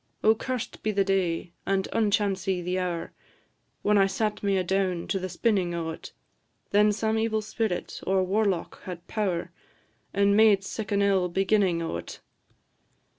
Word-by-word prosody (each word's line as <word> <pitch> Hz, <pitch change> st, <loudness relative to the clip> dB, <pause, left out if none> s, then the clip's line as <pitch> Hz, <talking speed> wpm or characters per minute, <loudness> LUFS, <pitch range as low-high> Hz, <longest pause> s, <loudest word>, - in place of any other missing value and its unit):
"O 220 Hz, -, +6 dB
curst 250 Hz, +1 st, -4 dB
be 215 Hz, -, -1 dB
the 200 Hz, -1 st, +2 dB
day, 185 Hz, -3 st, 0 dB
and 195 Hz, 0 st, 0 dB
unchancy 200 Hz, -3 st, +1 dB
the 180 Hz, +1 st, -1 dB
hour, 175 Hz, -2 st, -3 dB, 0.7 s
When 210 Hz, 0 st, +4 dB
I 195 Hz, -, +5 dB
sat 210 Hz, +2 st, -2 dB
me 200 Hz, -1 st, +1 dB
adown 185 Hz, -1 st, 0 dB
to 195 Hz, -, 0 dB
the 185 Hz, 0 st, -4 dB
spinnin' 185 Hz, -4 st, 0 dB
o't! 165 Hz, -1 st, -5 dB, 0.6 s
Then 210 Hz, +1 st, +5 dB
some 220 Hz, +1 st, 0 dB
evil 220 Hz, -1 st, 0 dB
spirit 215 Hz, -3 st, -3 dB
or 190 Hz, 0 st, +3 dB
warlock 195 Hz, -2 st, 0 dB
had 175 Hz, -2 st, -7 dB
power, 190 Hz, -6 st, -2 dB, 0.6 s
And 200 Hz, 0 st, +3 dB
made 210 Hz, -2 st, +5 dB
sic 210 Hz, +1 st, -5 dB
an 200 Hz, 0 st, +2 dB
ill 190 Hz, -3 st, +2 dB
beginnin' 190 Hz, -2 st, +2 dB
o't. 85 Hz, -, -5 dB
195 Hz, 150 wpm, -27 LUFS, 180-210 Hz, 0.7 s, O